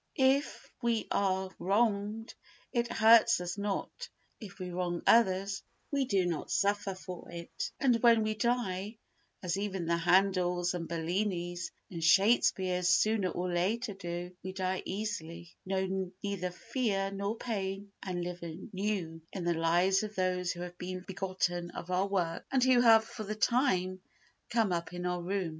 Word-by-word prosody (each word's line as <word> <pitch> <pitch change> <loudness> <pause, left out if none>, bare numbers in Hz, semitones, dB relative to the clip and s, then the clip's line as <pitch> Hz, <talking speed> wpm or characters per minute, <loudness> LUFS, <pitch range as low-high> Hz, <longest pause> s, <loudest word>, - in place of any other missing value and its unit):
If 270 +2 +2
we 235 -2 0
are 190 -1 +1
wronged 210 +2 0 0.4
it 235 -1 0
hurts 230 0 +6
us 175 -1 -4
not; 205 - -4 0.3
if 200 -4 -10
we 180 -2 -5
wrong 175 -1 -2
others, 195 -2 +3 0.3
we 280 -2 +1
do 195 -6 +2
not 170 -4 -2
suffer 200 -1 +1
for 185 -2 -9
it; 170 0 -5
and 245 -4 +3
when 230 -2 +6
we 215 0 0
die, 215 -2 -1 0.5
as 180 0 -1
even 195 -4 -2
the 170 +1 +1
Handels 180 0 +2
and 170 -2 -4
Bellinis 175 +1 -2 0.2
and 165 -2 -5
Shakespeares 185 0 +4
sooner 210 0 +3
or 180 +1 -3
later 205 +6 0
do, 175 -1 -6
we 185 0 -6
die 185 0 -1
easily, 170 -5 -5
know 190 -1 -1
neither 200 -3 -2
fear 195 0 -1
nor 200 +3 -3
pain 200 -3 -4
and 180 -2 -3
live 175 0 -5
anew 175 0 -4
in 190 - -5
the 170 0 +2
lives 175 +4 +3
of 215 0 -6
those 180 -1 0
who 175 - -6
have 175 0 -7
been 185 0 -5
begotten 185 -2 -2
of 180 - -6
our 185 +2 +2
work 175 -4 -1
and 265 -2 +3
who 255 -1 +5
have 225 -2 +7
for 220 - -7
the 215 +1 -4
time 190 -6 +1 0.5
come 225 -4 +2
up 170 0 -2
in 180 0 -4
our 180 0 -1
room. 185 0 -1
190 Hz, 160 wpm, -31 LUFS, 180-215 Hz, 0.5 s, have